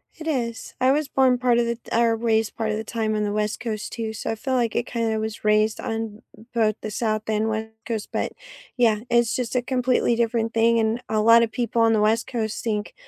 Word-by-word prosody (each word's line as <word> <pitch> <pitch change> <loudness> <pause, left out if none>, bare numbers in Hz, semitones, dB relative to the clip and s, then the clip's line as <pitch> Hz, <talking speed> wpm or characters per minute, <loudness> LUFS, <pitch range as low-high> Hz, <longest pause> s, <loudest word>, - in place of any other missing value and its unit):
It 320 - -10
is. 240 -7 -3
I 255 - +5
was 295 +1 +1
born 260 -3 +3
part 245 -1 +2
of 240 - +2
the 235 - -1
t 235 - -17
or 230 -1 +3
raised 225 -1 0
part 220 -1 -1
of 215 - -1
the 220 - -4
time 220 -1 -2
on 210 - 0
the 205 - -1
West 210 0 -1
Coast 220 -3 -4
too, 225 -1 -4
so 220 - -4
I - - -2
feel 260 +4 -2
like 235 -3 0
it 240 - 0
kinda 225 -2 -1
was 220 0 -5
raised 215 +1 +2
on 225 -1 -4
b 220 - -16
both 215 -2 +2
the 215 - -4
South 215 0 -2
and 215 0 +1
West 220 0 -2 0.2
Coast, 220 -3 -4
but, - - -2 0.4
yeah, 225 -4 +3
it's 235 -1 +3
just 250 -1 -3
a 250 - +3
completely 250 -1 +1
different 230 -1 0
thing, 230 +1 +4
and 225 +2 0
a 215 -1 +1
lot 230 +2 +7
of 225 - -1
people 235 0 0
on 225 0 +4
the 215 - +2
West 220 +2 +2
Coast 220 -4 -3
think 210 -2 -2
225 Hz, 250 wpm, -24 LUFS, 220-235 Hz, 0.4 s, lot